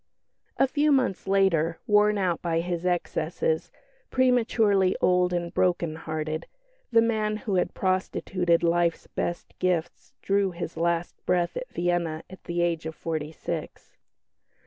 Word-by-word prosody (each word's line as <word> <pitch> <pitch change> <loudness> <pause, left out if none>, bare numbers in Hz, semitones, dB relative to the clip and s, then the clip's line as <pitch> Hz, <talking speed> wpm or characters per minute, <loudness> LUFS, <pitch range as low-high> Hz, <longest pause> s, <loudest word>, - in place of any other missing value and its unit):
A 270 - +4
few 295 +3 +2
months 255 -10 +1
later, 170 -4 +2
worn 210 0 +4
out 180 -4 0
by 165 -1 0
his 175 0 -2
excesses, 465 - -1 0.4
prematurely 225 -7 +3
old 180 0 +3
and 175 -1 -2
broken 175 -3 +1
hearted, 155 0 -4 0.4
the 230 -1 +5
man 215 -2 0
who 210 -1 -4
had 180 - 0
prostituted 185 -2 0
life's 170 0 +1
best 175 - -4
gifts 180 -3 -1
drew 200 0 +2
his 170 -1 -5
last 170 +1 -1
breath 175 -1 +1
at - - -5
Vienna 170 -2 -1
at 185 - -12
the 175 0 0
age 165 -2 -1
of 160 - -6
forty 155 -2 -3
six. - - -6
180 Hz, 140 wpm, -26 LUFS, 170-200 Hz, 0.4 s, the